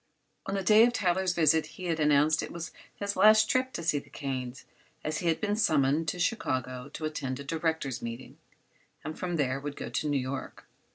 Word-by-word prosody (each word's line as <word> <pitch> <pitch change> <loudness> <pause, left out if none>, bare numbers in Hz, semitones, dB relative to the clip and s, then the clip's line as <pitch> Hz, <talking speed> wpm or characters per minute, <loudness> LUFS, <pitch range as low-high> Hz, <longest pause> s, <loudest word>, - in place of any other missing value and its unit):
On 195 - -2
the 195 - -1
day 215 +4 +7
of 240 +1 +3
Tyler's 185 -3 +1
visit 160 -1 +3
he 185 - -8
had 165 -2 -1
announced 150 +1 +4
it - - -6
was 170 -1 -6 0.2
his 200 0 -3
last 215 0 +6
trip 255 +2 +1
to 170 - -4
see 150 -3 +1
the - - -17
Kanes, 130 -2 -5 0.4
as 155 +1 -2
he 175 - -2
had 165 -1 +2
been 210 -1 0
summoned 155 -5 +2
to 155 - -1
Chicago 130 - -2
to 155 - -4
attend 135 -4 -3
a - - -6
directors' 160 -3 -2
meeting 115 +2 -7 0.6
and 155 - -5
from 175 -1 -2
there 135 -3 0
would 145 0 -6
go - - -6
on - - -7
to 155 - -1
New 145 - +2
York. 130 +1 -5
155 Hz, 215 wpm, -29 LUFS, 140-180 Hz, 0.6 s, day